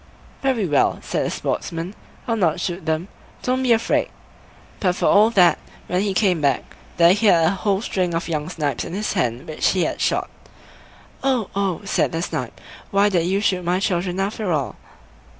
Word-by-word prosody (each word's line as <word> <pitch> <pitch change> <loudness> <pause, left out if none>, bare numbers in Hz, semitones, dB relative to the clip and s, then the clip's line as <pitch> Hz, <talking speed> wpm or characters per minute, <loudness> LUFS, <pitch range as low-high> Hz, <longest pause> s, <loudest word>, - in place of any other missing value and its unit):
"Very 260 -6 +1
well", 145 -5 +2
said - - -1
the - - -2
Sportsman, 165 +3 -3 0.3
"I'll 230 - +1
not 175 -5 +1
shoot 175 0 -4
them; 160 +3 0 0.4
don't 255 +1 0
be 255 -2 +2
afraid." 230 0 +2 0.7
But 180 -2 +1
for - - -1
all 210 +2 +6
that, 185 -6 +4 0.3
when 180 +1 0
he 200 -2 -1
came 185 -5 +2
back, 140 -3 0 0.2
there 170 +1 +6
he 210 +2 +1
had 170 -4 +5
a - - +4
whole 195 0 0
string 180 -6 -1
of 165 - -2
young 155 -1 -2
snipes 150 -5 -2
in 170 - -7
his 210 +3 -2
hand 125 +5 -1
which 155 - 0
he 185 -2 +1
had - - -2
shot. - - 0 0.9
"Oh, 255 -6 0
oh!" 195 -4 -1
said 195 - 0
the 165 +1 -1
Snipe, 125 -8 -4 0.3
"why 200 +1 +3
did 175 -4 +1
you 195 +2 +1
shoot 185 -3 +1
my 175 +2 +1
children 180 -1 -1
after 200 0 -1
all?" 135 -9 -1
180 Hz, 190 wpm, -22 LUFS, 165-200 Hz, 0.9 s, all